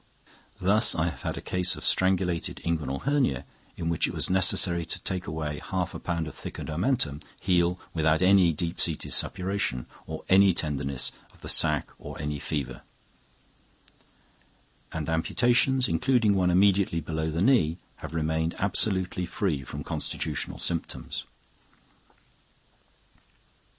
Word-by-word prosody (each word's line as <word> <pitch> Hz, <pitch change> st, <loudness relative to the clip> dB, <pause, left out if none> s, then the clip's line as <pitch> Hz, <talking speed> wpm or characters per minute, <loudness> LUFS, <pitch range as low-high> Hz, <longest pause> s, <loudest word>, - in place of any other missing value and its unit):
Thus 105 Hz, +5 st, +4 dB
I 85 Hz, +1 st, +1 dB
have 75 Hz, -, -10 dB
had -, -, -3 dB
a -, -, -5 dB
case 90 Hz, 0 st, +2 dB
of -, -, -6 dB
strangulated 95 Hz, -3 st, +1 dB
inguinal 80 Hz, -5 st, -2 dB
hernia 130 Hz, -, +1 dB, 0.3 s
in 80 Hz, -, -3 dB
which 85 Hz, -1 st, +1 dB
it -, -, -6 dB
was -, -, +2 dB
necessary 90 Hz, -2 st, +4 dB
to 80 Hz, -, -3 dB
take 95 Hz, -2 st, -3 dB
away 75 Hz, -2 st, -4 dB
half 90 Hz, -2 st, -2 dB
a -, -, -6 dB
pound 85 Hz, -2 st, -2 dB
of 80 Hz, -, -7 dB
thickened -, -, -7 dB
omentum, 80 Hz, -, 0 dB, 0.2 s
heal 90 Hz, -1 st, +1 dB
without 80 Hz, -1 st, +2 dB
any 95 Hz, -2 st, +5 dB
deep 85 Hz, +2 st, -4 dB
seated 80 Hz, -3 st, 0 dB
suppuration 95 Hz, -9 st, -1 dB, 0.2 s
or 80 Hz, 0 st, -6 dB
any 95 Hz, -1 st, +5 dB
tenderness 70 Hz, -5 st, -1 dB, 0.2 s
of -, -, -23 dB
the -, -, -5 dB
sac 75 Hz, -2 st, +3 dB
or -, -, -9 dB
any 75 Hz, 0 st, -3 dB
fever; 70 Hz, -5 st, -4 dB, 2.1 s
and 80 Hz, -2 st, -4 dB
amputations, 120 Hz, +10 st, +2 dB
including 110 Hz, +5 st, +2 dB
one 95 Hz, -2 st, +2 dB
immediately 95 Hz, -1 st, +3 dB
below 80 Hz, 0 st, -3 dB
the 80 Hz, +1 st, -2 dB
knee, 90 Hz, -, +3 dB, 0.2 s
have -, -, -8 dB
remained 80 Hz, +1 st, -1 dB
absolutely 95 Hz, -2 st, 0 dB
free 85 Hz, -9 st, -1 dB
from -, -, -7 dB
constitutional 75 Hz, -6 st, -3 dB
symptoms. 80 Hz, +7 st, -4 dB
85 Hz, 135 wpm, -27 LUFS, 80-95 Hz, 2.1 s, any